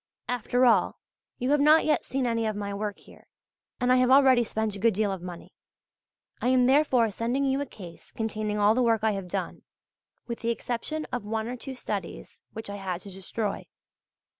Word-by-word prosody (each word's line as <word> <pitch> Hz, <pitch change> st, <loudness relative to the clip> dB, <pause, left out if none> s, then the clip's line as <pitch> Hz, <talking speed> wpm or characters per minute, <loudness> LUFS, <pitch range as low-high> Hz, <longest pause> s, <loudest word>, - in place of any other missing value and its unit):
After 245 Hz, +1 st, +1 dB
all, 220 Hz, -7 st, +3 dB, 0.4 s
you 250 Hz, +3 st, -1 dB
have 295 Hz, -, +4 dB
not 305 Hz, +3 st, +5 dB
yet 305 Hz, -, +2 dB
seen 265 Hz, -1 st, -1 dB
any 230 Hz, -2 st, 0 dB
of 215 Hz, -, -2 dB
my 200 Hz, -1 st, -4 dB
work 205 Hz, 0 st, -3 dB
here, -, -, -18 dB, 0.5 s
and 250 Hz, -1 st, +2 dB
I -, -, +5 dB
have 255 Hz, 0 st, +3 dB
already 260 Hz, -2 st, +6 dB
spent 220 Hz, -2 st, -2 dB
a -, -, -7 dB
good 225 Hz, 0 st, +3 dB
deal 210 Hz, -1 st, +1 dB
of 190 Hz, -2 st, -5 dB
money. 175 Hz, -1 st, -9 dB, 0.9 s
I -, -, 0 dB
am 255 Hz, -1 st, +4 dB
therefore 260 Hz, -4 st, +3 dB
sending 240 Hz, +7 st, -1 dB
you 270 Hz, +1 st, +1 dB
a 285 Hz, -, -3 dB
case 175 Hz, -7 st, -12 dB
containing 215 Hz, -1 st, -3 dB
all 210 Hz, +1 st, +4 dB
the 255 Hz, -, +1 dB
work 225 Hz, -3 st, +2 dB
I 220 Hz, -, +3 dB
have 195 Hz, -3 st, -4 dB
done, -, -, -4 dB, 0.6 s
with 235 Hz, -1 st, -5 dB
the 230 Hz, -, -2 dB
exception 245 Hz, +7 st, -3 dB
of 245 Hz, -, -2 dB
one 220 Hz, +1 st, -3 dB
or 245 Hz, -, -4 dB
two 265 Hz, +2 st, -7 dB
studies 195 Hz, -, -6 dB
which 220 Hz, 0 st, -7 dB
I 200 Hz, 0 st, -6 dB
had 185 Hz, -2 st, -4 dB
to 200 Hz, -, -11 dB
destroy. 195 Hz, +2 st, -4 dB
225 Hz, 205 wpm, -27 LUFS, 205-255 Hz, 0.9 s, already